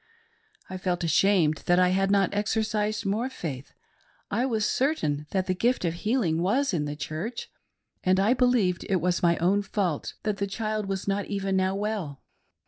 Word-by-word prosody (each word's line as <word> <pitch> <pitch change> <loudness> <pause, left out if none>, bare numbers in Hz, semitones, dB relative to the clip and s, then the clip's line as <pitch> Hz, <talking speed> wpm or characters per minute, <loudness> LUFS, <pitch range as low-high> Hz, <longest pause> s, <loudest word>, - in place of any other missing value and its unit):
I 185 - -6
felt 180 -2 -1
ashamed 165 -1 +3
that 175 - +4
I 180 0 +4
had 195 +1 +1
not 200 -1 +2
exercised 215 0 -1
more 220 +6 0
faith; 145 - -6 0.6
I 250 +3 +1
was 220 -4 0
certain 155 - 0
that 190 -1 0
the 185 - 0
gift 235 +2 +1
of 165 - 0
healing 175 -4 0
was 250 +8 +1
in 150 -4 0
the 145 0 -4
Church, 165 +10 -5 0.5
and 185 +1 +3
I 205 +5 +4
believed 245 -8 +2
it 195 - +2
was 180 +1 0
my 170 -1 +3
own 190 +5 +2
fault 195 -6 -2
that 210 -2 -1
the 200 - -1
child 215 0 -3
was 195 0 -3
not 200 0 0
even 195 -1 -1
now 190 0 +1
well. 200 -9 -3
195 Hz, 180 wpm, -27 LUFS, 175-215 Hz, 0.6 s, that